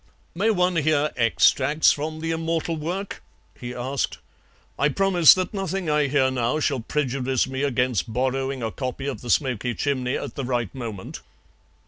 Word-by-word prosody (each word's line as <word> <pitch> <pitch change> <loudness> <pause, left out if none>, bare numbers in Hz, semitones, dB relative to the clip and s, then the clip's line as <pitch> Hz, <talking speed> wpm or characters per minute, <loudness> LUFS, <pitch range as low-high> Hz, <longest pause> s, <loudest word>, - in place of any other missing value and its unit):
"May 200 +6 +1
one 180 -4 +2
hear 150 -1 +2
extracts 130 +5 +3
from 155 +2 -4
the 165 0 -2
immortal 165 0 -1
work?" 175 +6 -4 0.4
he 120 0 -6
asked. 130 +2 -3 0.6
"I 140 - +3
promise 180 0 +6
that 185 +2 -3
nothing 195 -1 -3
that 150 -2 +1
I 150 -1 +2
hear 135 -1 +2
now 125 +3 0
shall 140 -3 0
prejudice 130 0 -1
me 130 0 -4
against 125 -6 0
borrowing 130 +2 -1
a 110 - -2
copy 130 +2 -5
of 140 - -4
the 120 - -8
SMOKY 125 -3 0
CHIMNEY 130 -3 -1
at - - -6
the 140 - -4
right 120 -5 -2
moment." 115 -7 -7
140 Hz, 165 wpm, -24 LUFS, 125-160 Hz, 0.6 s, promise